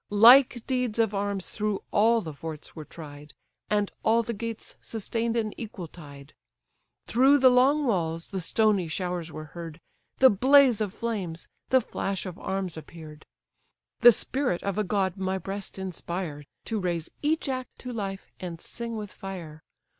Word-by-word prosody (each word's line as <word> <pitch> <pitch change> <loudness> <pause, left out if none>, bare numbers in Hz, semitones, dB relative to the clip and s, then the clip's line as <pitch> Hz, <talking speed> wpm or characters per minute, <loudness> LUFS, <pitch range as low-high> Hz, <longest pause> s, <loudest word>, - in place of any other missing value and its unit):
Like 240 +3 +7
deeds 250 -4 -1
of 225 -2 +2
arms 200 -2 -2
through 210 -1 -2
all 225 +2 +4
the 160 -5 -6
forts 155 +1 -8
were 155 -2 -7
tried, 145 -2 -11 0.3
And 205 -1 +1
all 230 +1 +3
the 235 - -3
gates 230 +1 -6
sustain'd 230 +1 -2
an 215 -2 -1
equal 205 -6 -6
tide; 145 -3 -13 0.7
Through 270 +4 +5
the 260 -2 +6
long 275 +4 +4
walls 165 -7 -1
the 190 -2 -3
stony 205 0 +2
showers 175 0 -3
were 155 - -7
heard, 165 -1 -8 0.4
The 260 -1 +7
blaze 255 +1 +5
of 205 -3 -1
flames, 195 -7 -4 0.2
the 260 0 +5
flash 195 -3 -3
of 180 -2 -7
arms 190 -4 -3
appear'd. 155 -1 -11 0.7
The 240 0 +10
spirit 250 -4 -1
of 200 +1 -1
a - - +2
god 190 -1 0
my 190 0 -1
breast 195 +1 -6
inspire, 175 -5 -5 0.2
To 220 -2 -2
raise 175 -3 -2
each 310 +1 0
act 255 -1 -4
to 250 -1 -6
life, 195 -3 -5
and 170 -3 -6
sing 235 +4 -6
with 210 -2 -6
fire! 170 -5 -8
200 Hz, 160 wpm, -27 LUFS, 170-230 Hz, 0.7 s, The